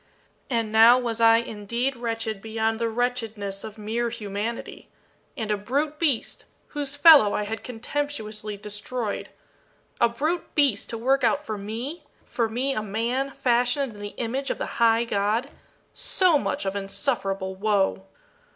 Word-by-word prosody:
And 230 -4 0
now 225 +3 +8
was 235 -2 -2
I 225 0 +7
indeed 235 +4 -2
wretched 225 -3 -3
beyond 225 0 -1
the 230 -1 0
wretchedness 225 -4 -2
of 215 0 -8
mere 225 +3 -2
humanity. 220 0 -5 0.5
And 220 -4 -2
a 210 - +1
brute 285 +9 -2
beast 285 -9 0 0.2
whose 290 -2 -3
fellow 290 -8 +7
I 210 - 0
had 220 +1 -5
contemptuously 225 -4 -4
destroyed 210 +2 -4 0.7
a 235 - +5
brute 310 +9 -2
beast 275 -9 +3
to 230 - -4
work 265 +4 +2
out 295 +1 +2
for 215 - -3
me 225 +10 -5 0.2
for 230 -2 -1
me 255 +5 0
a 215 - -1
man, 230 +6 -1
fashioned 245 0 +1
in 205 - -12
the 205 0 -7
image 260 +4 -2
of - - -1
the - - -5
High 230 0 +5
God 225 +5 0 0.4
so 355 -6 +3
much 285 - -2
of 195 +1 -2
insufferable 195 -1 -2
woe! 195 -1 0
230 Hz, 150 wpm, -25 LUFS, 210-255 Hz, 0.7 s, now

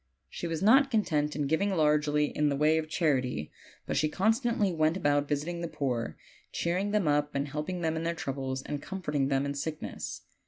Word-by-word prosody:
She 175 - -4
was 165 +2 -3
not 270 +6 +6
content 155 - +1
in 145 -1 -1
giv 160 +6 +1
ing 200 -1 +1
largely 150 -1 +2
in 150 0 +2
the 140 - 0
way 155 +3 +3
of 155 -1 -5
charity, 130 - 0 0.3
but - - -2
she 155 - +2
constantly 220 - +1
went 155 +2 +2
about 145 -4 +2
visiting 155 +4 -2
the 170 - -2
poor, 125 -7 -2 0.3
cheering 180 +4 -1
them 205 -5 +1
up 145 0 +1
and 140 +1 0
helping 150 +5 -4
them 160 -1 0
in 160 - -2
their 170 +1 -1
troubles, 135 -3 -3
and 145 -1 -4
comforting 150 -8 -2
them 135 0 +1
in 140 - -2
sickness. 150 +2 -5
155 Hz, 200 wpm, -29 LUFS, 145-175 Hz, 0.3 s, not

